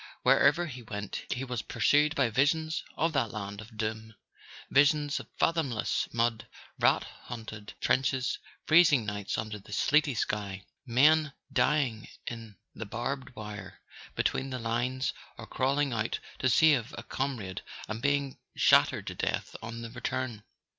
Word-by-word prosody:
Wherever 150 +5 +5
he 130 -6 -7
went 105 -3 -5
he 125 - -1
was 125 -4 -3
pursued 145 +8 +3
by 130 -5 +2
visions 155 +6 +1
of 165 0 +1
that 130 -6 +1
land 100 -1 -6
of 110 0 -13
doom: 110 0 -3 0.6
visions 145 +1 +4
of - - -9
fathomless 150 -9 +1
mud, 115 -1 0 0.3
rat - - +4
haunted 110 -3 -9
trenches, 130 -1 +1 0.3
freez¬ 165 +1 +7
ing 130 -7 +3
nights 105 -1 -3
under 110 -1 -4
the 100 - -15
sleety 145 +4 +3
sky, 100 -3 -2 0.2
men 150 +5 +4 0.2
dying 130 -8 +1 0.2
in 115 -3 -7 0.2
the 110 - -6
barbed 125 +3 -4
wire 105 -3 -8 0.4
between 135 - 0
the 130 - -3
lines 120 +3 -1 0.2
or - - -8
crawling 140 +1 0
out 110 0 -1 0.2
to 130 - +2
save 130 -2 +4
a 120 - -6
com¬ 135 +2 -2
rade 95 -4 -6 0.3
and 110 +1 -4
being 140 0 0 0.2
shattered - - +4
to - - -4
death - - -2
on 115 +1 -6
the 115 - -7
return. 125 -3 -3
120 Hz, 150 wpm, -30 LUFS, 110-140 Hz, 0.6 s, freez¬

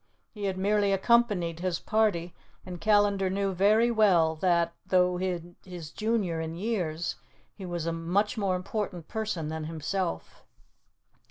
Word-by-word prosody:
He 205 -2 -5
had 190 -1 -1
merely 200 +1 +2
accompanied 195 -5 +2
his 180 -1 -1
party, 205 -6 0 0.3
and 180 -2 -8
Callandar 205 -2 +3
knew 195 0 -1
very 215 +6 +4
well 180 -8 +4
that, 170 -1 +2
though 180 -1 +2
his 175 -2 -5
junior 210 -7 -1
in 160 0 -4
years, 175 -5 -2 0.4
he 190 -3 -8
was 175 -2 -3
a 165 - -1
much 175 +6 0
more 200 -4 0
important 180 -3 -4
person 210 -8 -3
than 160 0 -4
himself. 160 - -4
185 Hz, 140 wpm, -28 LUFS, 170-205 Hz, 0.4 s, very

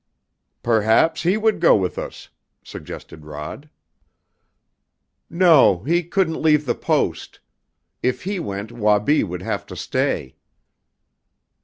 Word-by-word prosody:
"Perhaps 115 +8 +2
he 180 +5 +2
would 220 0 +1
go - - +5
with 95 -3 -1
us," - - -8 0.3
suggested 80 - -10
Rod. 75 - -8 1.6
"No, 160 - +4
he 170 +6 +1
couldn't 175 -1 -1
leave 150 -1 +3
the 120 - +1
Post. - - -2 0.6
If 125 0 -1
he 195 +1 -3
went 100 - -5
Wabi 105 +5 +2
would 90 -2 -6
have - - -3
to - - -9
stay." 65 - -2
125 Hz, 115 wpm, -21 LUFS, 100-165 Hz, 1.6 s, go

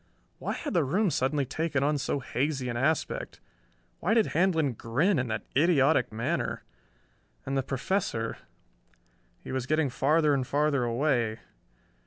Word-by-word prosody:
Why - - -2
had 295 - -4
the 170 -4 +3
room 185 +8 +1
suddenly 140 +1 0
taken 145 +1 -1
on 145 0 +1
so 140 +1 -1
hazy 130 0 -2
an 120 - -3
aspect? 160 - -1 0.6
Why 220 - +1
did 225 -3 +3
Handlon 160 -5 +2
grin 135 - +1
in 130 - -1
that 110 -1 -3
idiotic 145 -4 +3
manner? 110 +1 -2 0.8
And 135 - -2
the 135 - +2
Professor... 130 - -2 1.0
he - - -7
was 130 -1 -2
getting 155 -2 +1
farther 150 +4 +3
and 130 -2 0
farther 145 -3 +1
away 120 -2 0
140 Hz, 145 wpm, -28 LUFS, 125-160 Hz, 1.0 s, the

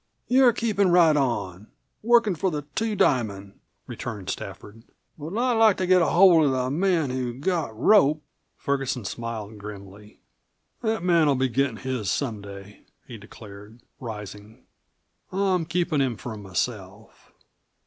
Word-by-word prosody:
"You're 255 0 +5
keepin' 210 -4 0
right 170 -3 +5
on 105 -8 -2 0.3
workin' 235 -2 +3
for 185 +3 -1
the 150 -3 -4
Two 220 +2 -1
Diamond," 100 - 0 0.3
returned 100 -5 -6
Stafford. 110 +2 -9 0.3
"But 160 +7 -7
I'd 250 +1 +1
like 220 -3 +5
to 185 - -1
get 180 0 +4
hold 170 -2 +5
of 140 - +2
the 130 0 -1
man 165 -3 +1
who 125 -2 -3
got 145 - -2
Rope." 155 - +4 0.3
Ferguson 135 -4 -2
smiled 110 -1 -6
grimly. 100 0 -11 0.6
"That 220 -5 -1
man'll 165 -5 +3
be 130 0 0
gittin' 130 -1 0
his 125 -6 -3
some 115 -7 -2
day," 100 0 -12 0.2
he 120 -4 -10
declared, 105 +2 -13 0.2
rising. 105 -1 -9 0.7
"I'm 185 -3 0
keepin' 165 -3 0
him 125 -5 -1
for 115 0 -7
myself. 100 +1 -6
130 Hz, 140 wpm, -24 LUFS, 105-175 Hz, 0.7 s, You're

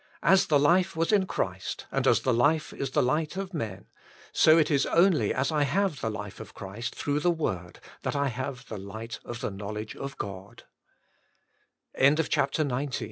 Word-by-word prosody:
As 190 0 +5
the 150 - +4
life 175 +6 +3
was 165 +3 +1
in 200 -3 +3
Christ, 95 - -3
and - - 0
as - - +4
the 130 - +1
Life 145 +7 +2
is 135 - -3
the - - +2
Light 150 +6 0
of 195 -1 -4
men, 110 - -4 0.5
so 155 +1 +6
it 155 -2 +3
is 140 -1 +2
only 170 0 +3
as 135 +3 0
I 150 -1 +1
have 155 +2 +1
the 110 - -1
life 105 -2 -6
of 110 - -10
Christ 105 +4 -6
through 145 0 -1
the 175 - +2
word 95 - -2 0.2
that - - -2
I 140 -1 +1
have 130 0 -5
the 110 - -6
light 110 +3 -7
of 120 -1 -7
the - - -2
knowledge 105 +2 -6
of 135 0 -6
140 Hz, 175 wpm, -28 LUFS, 110-160 Hz, 0.5 s, so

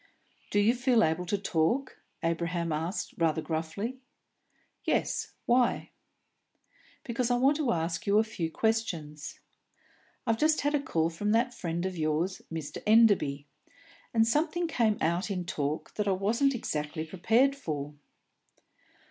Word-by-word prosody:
"Do 205 - +2
you 210 +3 +4
feel 245 -1 +3
able 160 +3 0
to 205 - +1
talk?" 195 - 0 0.2
Abraham 170 0 -1
asked, 165 +6 -3
rather 160 -1 +2
gruffly. 165 +11 -3 0.8
"Yes. - - -1
Why?" 245 0 +2 1.1
"Because 240 0 -1
I 245 - +3
want 270 +4 +3
to 285 -6 +1
ask 165 +1 -2
you 200 +1 +4
a 215 - +5
few 180 -7 -4
questions. 165 -8 -2 0.8
I've 225 -2 +1
just 310 0 +3
had 290 +1 0
a 295 - +2
call 165 - 0
from 205 +6 -1
that 240 +2 +2
friend 175 -4 -3
of 190 -1 -3
yours, 160 +4 0
Mr. 160 -3 -5
Enderby, 205 -11 +4 0.7
and 225 -1 +3
something 325 +7 +1
came 225 -9 +1
out 170 +5 0
in 180 -3 -2
talk 150 -2 -3
that 210 -1 -2
I 195 - +3
wasn't 230 +9 +1
exactly 150 -6 -3
prepared 225 - +2
for." 150 - -4
195 Hz, 140 wpm, -29 LUFS, 165-235 Hz, 1.1 s, a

